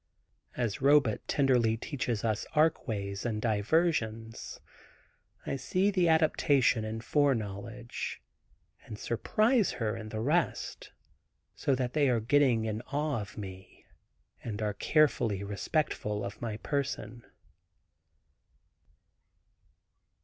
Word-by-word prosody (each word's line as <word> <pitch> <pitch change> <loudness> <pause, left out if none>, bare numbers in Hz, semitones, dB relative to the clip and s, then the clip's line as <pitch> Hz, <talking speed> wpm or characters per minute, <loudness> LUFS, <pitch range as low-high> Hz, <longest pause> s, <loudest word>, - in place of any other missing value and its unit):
As 120 -3 -1
Robet 140 -5 +4
tenderly 125 -5 +3
teaches 120 -4 -3
us 110 -2 -1
Arc 155 0 +3
ways 100 -3 -3
and 110 -3 -1
diversions, 115 0 0 0.9
I - - -2
see 185 +9 +1
the 180 -3 +2
adaptation 145 -7 +3
in 110 +1 -4
foreknowledge, 120 -4 -1 0.6
and 105 - -8
surprise 215 - +1
her 110 -3 -2
and 110 -1 -7
the 110 - -4
rest, 155 +9 -1 0.6
so 135 - 0
that 125 -1 -2
they 145 -3 +3
are 120 -2 +2
getting 120 -1 +3
an 110 0 -3
awe 145 -4 -1
of 100 - -10
me, 95 -2 -9 0.6
and 110 -3 -4
are 105 -1 -1
carefully 115 -7 +2
respectful 105 -1 -1
of 100 +1 -7
my 110 -3 -3
person. 140 -3 -3
120 Hz, 110 wpm, -30 LUFS, 110-145 Hz, 0.9 s, Robet